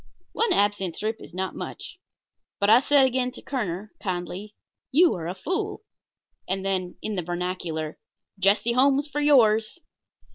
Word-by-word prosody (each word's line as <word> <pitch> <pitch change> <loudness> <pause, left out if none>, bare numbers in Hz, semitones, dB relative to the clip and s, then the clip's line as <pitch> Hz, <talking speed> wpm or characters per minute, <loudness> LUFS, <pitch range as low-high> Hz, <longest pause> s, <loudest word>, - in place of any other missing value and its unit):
One 460 - +1
absinthe 200 -4 +1
drip 220 +1 -2
is - - -11
not 185 +2 -3
much 365 - -8 0.6
but 200 +1 +3
I 230 - +8
said 275 0 +4
again 255 -1 +1
to - - -11
Kerner, 210 -6 -3
kindly: 185 +2 -4 0.4
"You 335 +6 +5
are 165 -2 -5
a 180 - -4
fool." 370 - -3 0.6
And 190 +1 -2
then, 185 -2 -1
in 215 - -2
the 185 - -1
vernacular: 175 -3 -4 0.4
"Jesse 205 +5 +3
Holmes 275 +3 +3
for 295 0 -3
yours." 225 -5 +4
210 Hz, 150 wpm, -25 LUFS, 180-260 Hz, 0.6 s, I